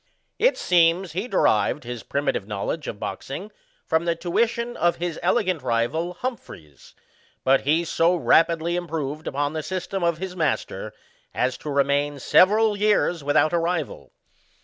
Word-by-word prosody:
It - - +3
seems, 175 0 +2
he 190 +8 -3
derived 110 - +2
his 120 -1 -6
primitive 140 -8 -2
knowledge 105 +9 -4
of 100 - -6
boxing 140 - -6 0.3
from 160 +1 +1
the 170 -1 +1
tuition 235 +8 -1
of 175 0 +2
his 175 -2 -4
elegant 185 -9 +1
rival 130 +9 -1
Humphreys; 170 - -8 0.5
but 135 +1 +4
he 160 +4 +2
so 170 +2 +2
rapidly 170 0 +2
improved 160 -3 -4
upon 145 +2 -1
the 155 - -2
system 185 +2 -4
of 170 -2 +1
his 185 +1 -6
master, 160 -4 -2 0.4
as 125 0 0
to 150 - -7
remain 140 +1 +1
several 210 - +4
years 205 -6 +1
without 155 +3 +2
a 170 - +3
rival. 165 -3 -3
165 Hz, 150 wpm, -24 LUFS, 145-180 Hz, 0.5 s, but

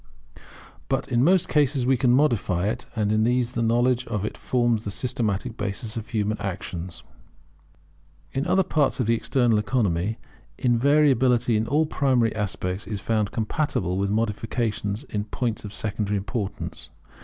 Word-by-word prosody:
[But - - 0
in 120 +1 +2
most 180 +3 +4
cases 140 -4 +2
we 130 +1 +4
can 125 0 +2
modify 120 - +2
it; 120 +2 -4
and 105 -2 +1
in 110 0 +3
these 120 +1 +1
the 120 - -2
knowledge 120 +2 +2
of 105 -3 -2
it - - -4
forms 120 -3 +1
the 105 - -4
systematic 115 +1 -2
basis 105 +2 -4
of 115 -1 -5
human 110 -2 -1
action] 95 -2 -4 1.4
In 135 +6 -2
other 190 +2 +3
parts 145 -5 +1
of 125 - +1
the 115 - +3
external 115 -1 +2
economy, 105 -2 0 0.4
invariability 125 -2 +3
in 110 +1 0
all 155 +3 +2
primary 130 -7 +1
aspects 95 -2 -3
is 105 -1 -3
found 110 -3 0
compatible 110 - -1
with 100 0 0
modifications 110 0 -1
in 105 -6 -4
points 115 +1 -3
of 105 - -7
secondary 105 -1 -2
importance. 100 0 -4
115 Hz, 155 wpm, -25 LUFS, 105-125 Hz, 1.4 s, most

